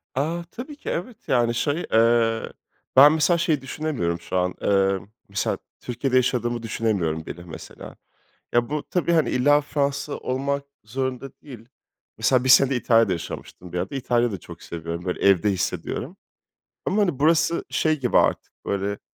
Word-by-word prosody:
A, 160 +6 -1
tabii 270 +5 -8
ki, 290 - -7
evet, 200 +6 -4
yani, 120 -2 +2
şey, 145 +7 -1
eee, 115 0 +3 0.4
ben 140 +3 +9
mesela 160 +2 +3
şeyi 160 -4 +1
düşünemiyorum 130 - -2
şu 85 +2 -3
an, 90 0 +1
emm, 95 -1 +1 0.2
mesela 100 -1 -1 0.2
Türkiye'de 125 +2 -2
yaşadığımı 120 -2 +1
düşünemiyorum 95 -9 -1
bile 85 +3 -8
mesela. 85 -3 -10 0.6
Ya, 120 0 +2
bu 150 0 -2
tabii, 175 -1 0
hani, 160 -2 +3
illa 145 +4 +4
Fransa 145 0 -2
olmak 140 +2 -2 0.2
zorunda 130 +3 -3
değil. 120 -5 -12 0.5
Mesela 130 -1 +3
1 130 - 0
sene 130 +1 +6
İtalya'da 115 -4 +3
yaşamıştım 90 +1 -8
bir - - -2
ara 90 - -2
da. - - -7
İtalya 120 -2 +1
da 95 - -5
çok - - -12
seviyorum, 85 +1 -6
böyle, 90 - -3
evde 100 +1 +4
hissediyorum 95 - -3 0.7
ama, 210 +3 +1
hani, 175 -10 0
burası 165 +2 +2
şey 155 -1 +1
gibi 125 -3 +2
artık, - - +1
böyle, 100 +1 -2
125 Hz, 160 wpm, -24 LUFS, 100-145 Hz, 0.7 s, ben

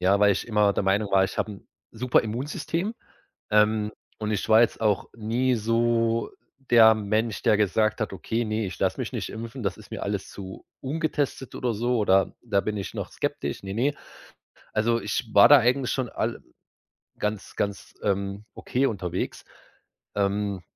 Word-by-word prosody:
ja, 95 +2 +3
weil 105 -1 +6
ich 95 - -3
immer 105 -3 +3
der - - 0
Meinung 100 +1 +1
war, 95 0 +5
ich - - -5
habe 105 - -1
'n 100 - -14 0.2
super 125 +2 +2
Immunsystem, 150 - -3 0.6
ähm, 105 0 +3 0.3
und 110 0 -2
ich 105 - -1
war 110 +1 +7
jetzt 115 - 0
auch 105 -3 +1
nie 120 +4 +1
so 115 +1 +1 0.4
der 110 -2 +8
Mensch, 110 +1 -1
der 105 - +4
gesagt 110 +2 +1
hat: 105 - -2
„Okay, 115 +5 -2
ne, 110 -1 -1
ich 90 -4 -7
lasse - - 0
mich - - -4
nicht - - -4
impfen, 115 +3 -7
das 95 -4 -1
ist - - -15
mir - - -5
alles - - -3
zu 95 -2 -9 0.2
ungetestet,“ 145 -2 -2
oder 120 -3 -1
so, 120 +3 0
oder: 95 -2 +3
„Da 105 -5 +1
bin 105 +1 -3
ich 100 -3 -5
noch - - -4
skeptisch,“ - - -3
ne, 95 - -5
ne. 135 +6 +1 0.8
Also, 115 +2 +1
ich 110 +2 -3
war 100 - +8
da 145 - +9
eigentlich 125 +1 +1
schon 130 -3 -1
al - - -3 0.8
ganz 105 -1 -3
ganz, 100 -1 -3
ähm, 100 0 -1
okay 130 +2 -1
unterwegs. 90 -5 -3 0.7
Ähm 100 -1 0
110 Hz, 175 wpm, -26 LUFS, 100-120 Hz, 0.8 s, da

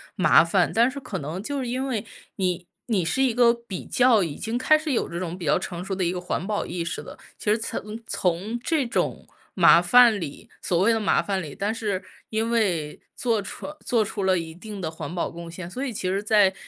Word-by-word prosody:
麻 155 -4 +6
烦， 175 +2 +2
但 235 +2 +4
是 280 - -6
可 210 -8 -5
能 160 +6 -5
就 285 +4 -3
是 255 - -3
因 255 +3 -2
为 235 -6 -2 0.3
你 180 -2 -1 0.2
你 200 -7 +1
是 170 +11 0
一 255 -4 +2
个 240 -1 +6
比 235 -6 -7
较 245 -5 +4
已 155 -4 -4
经 225 +2 -3
开 310 +5 +5
始 310 0 -1
有 250 - 0
这 170 - -5
种 175 -1 -4
比 175 - -6
较 - - +3
成 175 0 -6
熟 195 - -3
的 190 -1 -1
一 170 - +1
个 180 - -3
环 180 +1 -3
保 210 -1 -1
意 175 -1 -3
识 165 - -4
了。 - - -11 0.2
其 210 - 0
实 215 - +3
从 220 -1 -5
从 190 +6 -1
这 320 -2 +1
种 - - -2 0.3
麻 170 -3 +7
烦 230 +4 +6
里， 150 -5 -7
所 180 - 0
谓 205 +6 +4
的 225 - +2
麻 210 - +2
烦 195 -2 -2
里， 150 -5 -7
但 205 +2 -1
是 205 -4 -2 0.3
因 220 +1 -1
为 180 -10 0 0.2
做 230 -4 0
出 195 - -7 0.2
做 235 -4 +2
出 205 -1 -4
了 190 -1 +3
一 165 -1 -6
定 205 +3 -8
的 170 -4 -3
环 160 -1 -7
保 175 - -1
贡 170 0 -9
献， 170 +1 -7
所 255 +9 -5
以 275 - -2
其 195 -4 -3
实 195 +2 0
在 205 -2 +4
200 Hz, 260 characters per minute, -25 LUFS, 175-230 Hz, 0.3 s, 麻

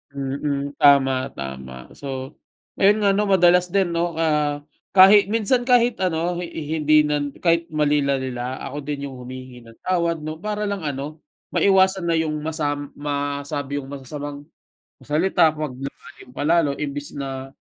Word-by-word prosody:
Mm. 140 +1 -2
Tama, 135 -2 +4
tama. 65 -1 -8
So, 135 0 -7 0.4
ayun 205 +2 +4
nga, 200 - +5
‘no, 205 +1 +1
madalas 180 -1 +4
din 185 -1 +1
‘no, 170 0 -1
ah, 150 -2 0 0.3
kahit 195 +1 +8
minsan 230 +3 +1
kahit 245 -1 +3
ano, 175 0 0
hi 175 - -4 0.3
hindi 150 0 +5
nan 145 -1 -1
kahit 170 -1 +2
mali 150 -1 +2
na 140 0 +1
nila, 130 -1 -4
ako 140 +1 -6
din 145 -1 -3
'yung 135 -2 -7
humihingi 125 -1 -10
ng 115 - -15
tawad 170 -3 0
‘no. 155 +1 -5
Para 210 +1 -3
lang 200 -6 -3
ano, 145 +3 -5 0.3
maiwasan 190 -2 +3
na 165 - +2
'yung 155 -1 -1
masam 145 -2 -2
masabi 145 0 -3
'yung 135 -1 -5
masasamang 145 +1 -7 0.5
salita 165 +2 +3
‘pag 150 -4 -3
lumalim 135 -1 -10
pa - - -2
lalo 160 -3 +2
imbes 145 0 -5
na, 135 -1 -5
150 Hz, 155 wpm, -22 LUFS, 140-175 Hz, 0.5 s, kahit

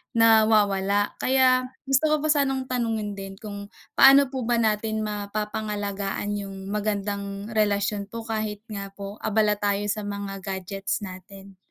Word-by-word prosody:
nawawala 210 -3 +4
kaya 255 -1 +3 0.2
gusto 270 +3 +2
ko 305 - +3
pa 310 - 0
sanang 270 -3 +1
tanungin 225 -4 -1
din 195 -1 -7
kung 205 -1 -8 0.3
paano 275 0 +7
po 265 -2 -3
ba 240 - +3
natin 220 -1 0
mapapangalagaan 205 -1 -3
yung 195 0 -7
magandang 200 0 -3
relasyon 205 -1 +1
po 230 0 -6
kahit 215 -2 -3
nga 200 -1 -4
po 200 +1 -8
abala 210 -1 +2
tayo 205 0 0
sa 215 - -2
mga 200 -1 -5
gadgets 195 +1 -3
natin. 195 +1 -11
210 Hz, 140 wpm, -25 LUFS, 200-225 Hz, 0.3 s, paano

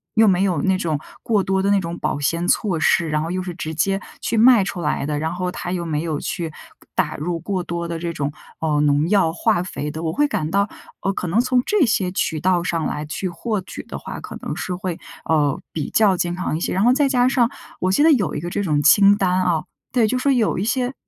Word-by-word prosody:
又 220 0 +6
没 185 -2 +3
有 180 -7 +1
那 190 -1 +2
种 160 -5 -1 0.2
过 210 -4 +2
多 190 0 +1
的 200 - +1
那 200 - +4
种 170 -2 -5
保 - - -1
鲜 165 +4 0
措 185 -6 +1
施， 165 0 +2
然 150 0 0
后 165 - -3
又 185 0 -2
是 180 -1 -5
直 160 -1 -5
接 195 +5 +1 0.2
去 230 - -1
卖 235 -2 +7
出 190 -2 -4
来 150 -2 -1
的。 150 0 -2
然 160 +2 -2
后 180 0 -2
它 175 - -5
又 175 -2 -2
没 155 -2 -1
有 155 -3 -2
去 170 -3 -4 0.4
打 - - 0
入 170 +3 -2
过 190 +1 -2
多 170 0 -4
的 165 -1 -4
这 170 0 -3
种， 145 -2 -2 0.3
嗯， 150 -2 +1
农 145 +2 +2
药 195 -6 +3
化 175 +1 +1
肥 150 -5 -5
的。 160 +1 -6
我 160 - -1
会 295 +1 +2
感 155 - -2
到， 200 +2 +2 0.3
呃， 195 - 0
可 180 - -4
能 180 +7 +2
从 250 0 +2
这 410 -9 +3
些 195 -5 +1
渠 160 -4 -1
道 180 +1 +2
上 165 -2 -1
来 150 - -4
去 180 +5 -3
获 190 +4 -3
取 - - -8
的 - - -7
话， - - -7
可 - - -8
能 - - -4
是 180 - -3
会， 180 -2 -4 0.3
呃， 150 -4 +2
比 155 - -3
较 210 -4 +4
健 175 0 -1
康 180 -4 -2
一 - - -4
些。 - - -1
然 190 - +1
后 245 +2 +5
再 280 0 +2
加 250 -2 +3
上 245 -3 +3 0.3
我 185 - +2
记 195 - +2
得 320 - +6
有 220 -9 0
一 - - -2
个 175 +3 -5
这 200 - -2
种 150 -5 +1
清 200 +7 +6
单 185 -2 +1
啊， 170 -4 +1 0.3
对， 240 -4 +3
就 255 - 0
说 275 +2 +2
有 240 -5 +2
一 185 - -1
些 250 +3 0
180 Hz, 275 characters per minute, -21 LUFS, 160-205 Hz, 0.4 s, 卖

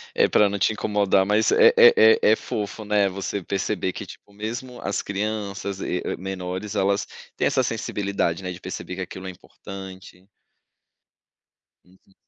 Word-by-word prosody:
É, - - +4
pra 105 - +4
não 100 0 -3
te 100 - +2
incomodar. 105 -3 +2
Mas 105 +2 +2
é 465 0 +7
é 470 0 +8 0.3
é 475 - +5
é - - +4
fofo, 105 +1 -5
né, 105 -1 +2
você 100 +1 -4
perceber 95 0 -2
que, - - -7
tipo, 100 - -14
mesmo 120 +4 -6
as 100 - -2
crianças 100 -1 -4
e 90 - -2
e - - -3
menores, 95 +2 -5
elas 100 +1 +1 0.3
têm - - 0
essa - - +2
sensibilidade, 100 -3 -2
né, 90 -1 -4
de 90 - -10
perceber 90 - -6
que - - -6
aquilo 95 +1 -8
é - - -4
importante. 95 0 -11 1.6
Uhum. 95 +1 -26
100 Hz, 165 wpm, -24 LUFS, 95-105 Hz, 1.6 s, é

